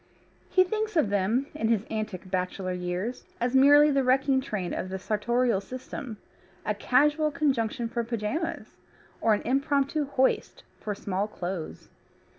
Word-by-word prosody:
He 370 - +5
thinks 435 +3 -2
of 220 -10 +3
them, 205 +7 +1
in 295 -7 -1
his 225 -2 +1
antic 215 -4 -4
bachelor 185 0 -2
years, 180 +7 -3 0.2
as 245 +1 0
merely 290 +3 +7
the 275 -1 +2
wrecking 265 +1 +3
train 195 -8 -3
of 185 - -3
the 190 - -3
sartorial 225 +2 +1
system, 250 +1 -7 0.5
a 210 - +1
casual 295 +8 +2
conjunction 245 -6 0
for 235 +1 -2
pyjamas, 240 +9 -3 0.4
or 220 -2 +4
an - - -5
impromptu 280 +3 +1
hoist 265 -1 0 0.2
for 210 -1 -4
small 195 +1 -2
clothes. 180 -5 -6
235 Hz, 145 wpm, -27 LUFS, 205-275 Hz, 0.5 s, merely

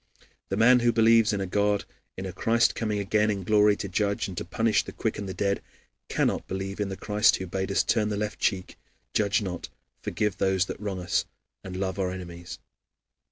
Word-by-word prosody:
The 95 - -1
man 125 +3 +6
who 120 0 +3
believes 115 -1 +5
in 100 -2 -1
a - - -1
God, 100 +2 +1 0.3
in 95 - -5
a 95 - -5
Christ 115 +1 +2
coming 105 -2 -2
again 105 +2 +1
in 100 -2 -2
glory 105 +2 +4
to 100 - -5
judge 100 +2 0
and 95 - -7
to - - -4
punish 110 +5 +1
the - - -8
quick - - -2
and 100 -2 -5
the - - -4
dead, 100 +1 0 0.5
cannot - - 0
believe 95 +1 -4
in 105 -1 -1
the 95 - -5
Christ 105 +1 +3
who 95 - -4
bade 95 +2 -3
us 100 - +2
turn 110 -2 +1
the 105 - -2
left 105 0 -3
cheek, 95 -3 -1 0.3
judge 105 +1 +2
not, 90 -3 -5 0.3
forgive 105 -2 -2
these 95 -1 +2
that - - -6
wrong 100 -3 -3
us, 90 -1 0 0.4
and 95 -1 -6
love 95 +1 -2
our 95 -1 0
enemies. 85 -1 -7
100 Hz, 210 wpm, -27 LUFS, 95-105 Hz, 0.5 s, man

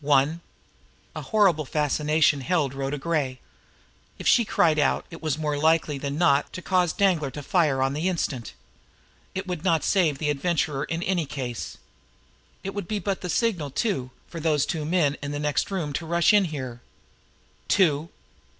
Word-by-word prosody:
One!" 145 +3 +2 0.7
A - - -4
horrible 195 -8 +3
fascination 150 0 +1
held 140 -1 0
Rhoda 135 +1 -3
Gray. 140 -4 -1 0.8
If - - -4
she 235 - +5
cried 160 -6 +2
out, 145 - +1
it 165 - -9
was 155 -3 -1
more 150 -2 -1
likely 160 -2 +2
than 140 +1 -3
not 150 -4 +3
to 185 - -6
cause 180 -3 +2
Danglar 175 -8 +2
to 145 +2 -8
fire 145 -6 +2
on 135 +1 0
the 160 +6 0
instant. 135 - -3 0.8
It 190 +1 -3
would 180 -4 -4
not 165 -4 +2
save 170 -8 +2
the 150 +1 0
Adventurer 145 -1 -1
in 165 +1 -3
any 175 -5 0
case. 130 -5 -5 0.9
It 195 - -4
would 205 -4 -5
be 215 - -1
but 200 -1 -2
the 180 - -4
signal, 180 -7 0
too, 140 - -1 0.2
for 170 - -7
those 150 -3 +2
two 155 -3 -3
men 155 -3 +1
in 145 0 -4
the 145 - -3
next 150 -1 0
room 170 -7 -3
to 165 +3 -4
rush 170 +3 +3
in 205 -2 +5
here. 130 -7 -6 0.9
"Two!" 165 -4 +2
155 Hz, 175 wpm, -25 LUFS, 145-175 Hz, 0.9 s, she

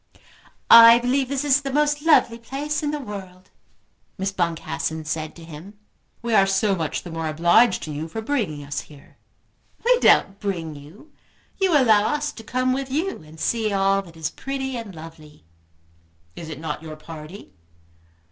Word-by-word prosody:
"I 230 0 +10
believe 250 +2 0
this 280 +1 -2
is 285 0 +3
the 275 -1 -4
most 295 +1 +1
lovely 295 -7 +3
place 285 +5 -4
in 295 - -1
the 300 0 -3
world," 190 -6 -9 0.7
Miss 195 +1 -2
Boncassen 165 -3 -3
said 155 0 -4
to 170 - -12
him. 165 +6 -11 0.5
"We 235 -1 -2
are 195 -2 +5
so 195 +1 +1
much 160 -4 -3
the 175 - -9
more 165 -1 -3
obliged 170 +9 +3
to 155 - -6
you 150 +2 -5
for 225 - -6
bringing 220 - -2
us 145 +1 -4
here." 145 -2 -18 0.7
"We - - +4
don't 195 - +4
bring 170 -6 -4
you. 150 - -14 0.5
You 375 -5 +3
allow 220 -5 +4
us 295 0 -2
to 225 - -12
come 255 +2 0
with 270 0 -3
you 320 - -2
and 155 +1 -15
see 220 +4 0
all 195 0 +2
that 170 -4 -15
is 160 -1 -3
pretty 270 -1 -4
and 225 -6 -7
lovely." 155 - -13 0.9
"Is 165 -2 -8
it 155 - -7
not 155 -2 -5
your 160 -1 -8
party?" 155 - -11
195 Hz, 175 wpm, -23 LUFS, 160-260 Hz, 0.9 s, I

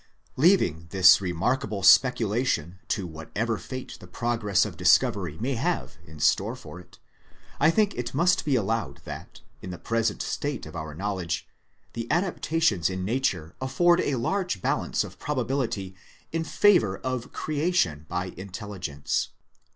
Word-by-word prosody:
Leaving 130 - +3
this 95 +1 +7
remarkable 100 +4 -1
speculation 105 - +3
to 100 - -1
whatever 100 +8 -3
fate 130 -1 -7
the - - -12
progress 115 -4 +1
of - - -6
discovery 90 -7 +3
may 125 +9 -1
have 115 - -2
in 75 0 -12
store - - +2
for 90 - -10
it, 90 - -16 0.6
I 160 - +5
think 205 +4 +2
it 120 -1 -4
must 170 +5 +2
be 145 -3 +1
allowed 115 -1 -1
that, - - -9 0.2
in 95 - -7
the 90 - -6
present 115 +3 -1
state 145 -4 -3
of 80 - -10
our 80 -2 -6
knowledge, 90 -3 -3 0.5
the 115 0 -5
adaptations 165 - +1
in 95 0 -3
Nature 95 -9 -1
afford 175 +7 +3
a 145 - 0
large 175 - -1
balance - - 0
of - - -11
probability 125 -8 -2 0.4
in 165 0 -1
favour 160 - +4
of 130 -2 -4
creation 145 - 0
by 90 +1 -3
intelligence. 95 -6 -4
110 Hz, 145 wpm, -26 LUFS, 90-135 Hz, 0.6 s, this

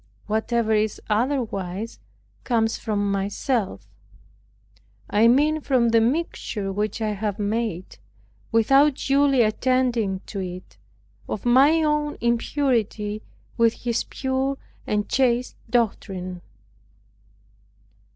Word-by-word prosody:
Whatever 220 +1 0
is 215 0 +1
otherwise 220 -4 -1 0.4
from 225 -3 0
myself; 200 +3 -2 1.2
I 215 +3 +5
mean 300 +6 +3
from 255 -5 +2
the 230 0 +4
mixture 230 -6 -1
which 210 +2 -2
I 215 - 0
have 205 0 -3
made, 210 -3 -3 0.5
without 270 +6 +4
duly 275 -2 +3
attending 230 -3 +1
to 200 - -6
it, 180 - -7 0.5
of 215 - -4
my 280 +7 +5
own 300 -1 0
impurity 230 -4 0 0.4
with 230 -1 +4
his 235 -1 -2
pure 265 +1 -2 0.3
and 210 -1 0
chaste 250 -1 +1
doctrine. 190 -6 -1
230 Hz, 95 wpm, -24 LUFS, 210-260 Hz, 1.2 s, I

